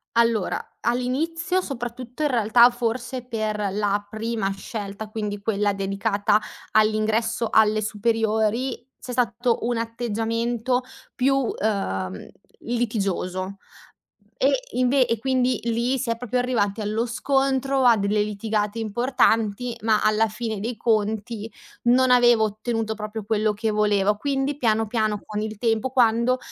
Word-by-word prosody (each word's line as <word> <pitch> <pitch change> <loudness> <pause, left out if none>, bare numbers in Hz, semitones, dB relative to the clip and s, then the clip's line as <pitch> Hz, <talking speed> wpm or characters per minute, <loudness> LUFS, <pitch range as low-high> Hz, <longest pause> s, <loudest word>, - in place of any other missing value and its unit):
Allora, 230 -4 0
all'inizio 320 +10 0
soprattutto, 245 -1 -6
in 300 - +2
realtà 235 0 +5
forse 245 +1 -3
per 215 -4 -2
la 205 0 0
prima 220 -1 -2
scelta, 205 0 -6
quindi 210 -2 -4
quella 205 -1 0
dedicata 200 +1 +1 0.3
all'ingresso 215 +2 +2
alle 215 0 +4
superiori, 220 +3 0 0.3
c'è 250 - -7
stato 240 0 +1
un 240 0 0
atteggiamento 230 +2 -1 0.3
più, 270 +2 +2
uhm, 195 - -2 0.3
litigioso 200 -5 -2 0.8
e - - +4 0.2
inve 255 +1 +3
e 230 - 0
quindi 255 -1 +1
lì 235 +3 0
si 235 -2 -2
è 230 - 0
proprio 250 +1 -2
arrivati 225 -4 0
allo 215 +3 -1
scontro, 270 +2 +1
a 235 -2 +6
delle 205 +1 +1
litigate 210 +1 -2
importanti, 230 0 +1
ma 220 -1 +3
alla 215 +1 +3
fine 215 -1 -4
dei 230 +2 -3
conti 220 0 -1 0.4
non 255 +1 +5
avevo 240 -3 +5
ottenuto 220 +1 -2
proprio 215 0 -6
quello 215 0 +1
che 215 +1 -2
volevo. 210 -1 +2
Quindi 275 +3 -1
piano 225 -4 +1
piano 215 -2 0
con 210 0 -3
il 215 -1 -4
tempo 225 +2 0
quando, 240 0 +3
225 Hz, 130 wpm, -24 LUFS, 210-245 Hz, 0.8 s, a